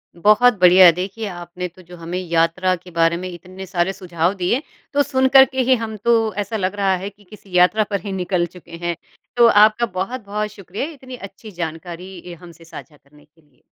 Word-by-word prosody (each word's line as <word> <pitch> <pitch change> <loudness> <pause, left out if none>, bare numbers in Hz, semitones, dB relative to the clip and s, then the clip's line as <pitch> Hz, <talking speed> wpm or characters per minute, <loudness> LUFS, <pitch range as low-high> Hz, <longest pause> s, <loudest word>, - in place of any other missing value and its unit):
बहुत 215 +7 +5
बढ़िया। 180 0 +8
देखिए, 190 +6 -5
आपने 175 -1 -6
तो 180 +1 -17
जो 175 0 -13
हमें 170 +2 -5
यात्रा 170 +1 +1
के 180 +1 -15
बारे 165 0 +2
में 185 +1 -6
इतने 185 +2 -10
सारे 180 0 -1
सुझाव 175 -2 -1
दिए, 200 +8 -1 0.3
तो 285 0 +3
सुनकर 265 -1 +5
के 260 0 -2
ही 255 +1 +3
हम 225 -2 -5
तो 225 0 +1
ऐसा 220 +2 -4
लग 190 0 -2
रहा 195 -2 +1
है 190 +2 -6
कि 205 0 -24
किसी 195 -2 -7
यात्रा 180 +5 +4
पर 200 -2 -1
ही 200 - -6
निकल 180 -2 -1
चुके 170 -1 -11
हैं। 170 - -1 0.4
तो 235 - +7
आपका 215 +2 +5
बहुत-बहुत 210 +1 -4
शुक्रिया 200 +4 -6
इतनी 260 -4 -11
अच्छी 210 0 -11
जानकारी 175 +2 -7 0.2
ए - - -7
हमसे 170 -1 -15
साझा 160 -2 -12
करने 145 +1 -23
के 155 +2 -30
लिए। 145 -5 -33
185 Hz, 200 wpm, -20 LUFS, 175-215 Hz, 0.4 s, बढ़िया